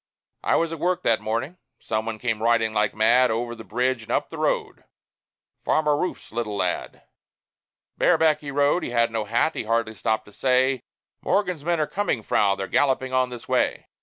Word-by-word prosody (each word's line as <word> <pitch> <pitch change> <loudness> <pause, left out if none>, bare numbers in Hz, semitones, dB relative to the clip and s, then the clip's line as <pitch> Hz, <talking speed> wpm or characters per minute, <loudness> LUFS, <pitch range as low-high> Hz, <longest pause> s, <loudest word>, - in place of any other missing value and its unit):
I - - +2
was 165 0 +1
at 165 - -6
work 180 +2 0
that 115 -1 +2
morning. 115 +11 -3 0.2
Some 110 0 -3
one 115 -1 -3
came 110 -1 -2
riding 115 -1 +2
like 105 -1 +1
mad 120 +4 +4
Over 120 +1 -2
the 115 -1 -10
bridge 125 +4 -1
and 110 - -9
up - - 0
the - - -7
road - - -1 0.8
Farmer 150 -1 +2
Rouf's 180 +5 -4
little 110 -2 -3
lad. 90 -3 -3 1.0
Bareback 160 -2 +3
he 145 - -7
rode; 145 +5 +2
he - - -4
had 115 -1 +2
no 110 -2 -2
hat; 120 +9 +1
he - - -4
hardly 115 0 0
stopped 110 +2 -1
to 105 - -17
say, 130 +1 +2 0.4
"Morgan's 180 -6 0
men 170 0 0
are 155 - +2
coming, 150 - -2
Frau; 100 -1 +2
they're 95 - -4
galloping 130 +2 +1
on 130 -1 +2
this 120 -2 -9
way. - - 0
120 Hz, 190 wpm, -24 LUFS, 110-145 Hz, 1.0 s, mad